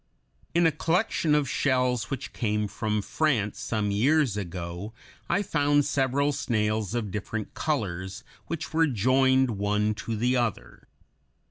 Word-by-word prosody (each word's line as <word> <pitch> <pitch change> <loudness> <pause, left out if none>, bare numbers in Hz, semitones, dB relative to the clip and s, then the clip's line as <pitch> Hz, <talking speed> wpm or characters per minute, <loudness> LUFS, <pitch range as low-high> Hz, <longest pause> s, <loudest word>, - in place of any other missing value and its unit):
In 170 0 +4
a 165 - +5
collection 165 0 +1
of 150 -2 +2
shells 125 -5 +1
which 135 +1 -5
came 105 -2 0
from 105 0 -2
France 110 -3 0
some 105 -2 -1
years 130 +3 +3
ago 90 +1 -5 0.4
I 205 - +2
found 145 -4 +2
several 140 0 +1
snails 110 -4 -1
of 110 -5 -2
different 105 +2 -4
colors 95 - -2 0.2
which 160 -1 -5
were 165 0 +4
joined 130 +2 +3
one 105 +1 +1
to 110 +2 -4
the 120 +4 +1
other. 120 -4 -3
120 Hz, 135 wpm, -27 LUFS, 105-145 Hz, 0.4 s, a